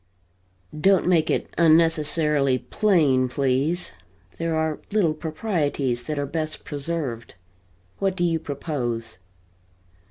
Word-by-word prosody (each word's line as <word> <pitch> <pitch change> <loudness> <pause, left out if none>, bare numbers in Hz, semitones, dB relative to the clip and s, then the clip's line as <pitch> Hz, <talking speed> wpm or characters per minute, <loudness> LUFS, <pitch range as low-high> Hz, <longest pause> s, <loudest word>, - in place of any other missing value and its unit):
"Don't 190 +4 +3
make 165 -3 +3
it - - -1
unnecessarily 155 -4 +3
plain, 145 -10 +2
please. 140 +6 0 0.5
There 165 -1 -1
are 160 -1 -1
little 195 -7 +2
proprieties 155 - -2
that 155 -1 -3
are 145 - -1
best 155 +1 -4
preserved. 145 - -4 0.6
What 195 -1 0
do 175 - -1
you 165 -2 +1
propose?" 125 - -4
155 Hz, 105 wpm, -24 LUFS, 140-165 Hz, 0.6 s, Don't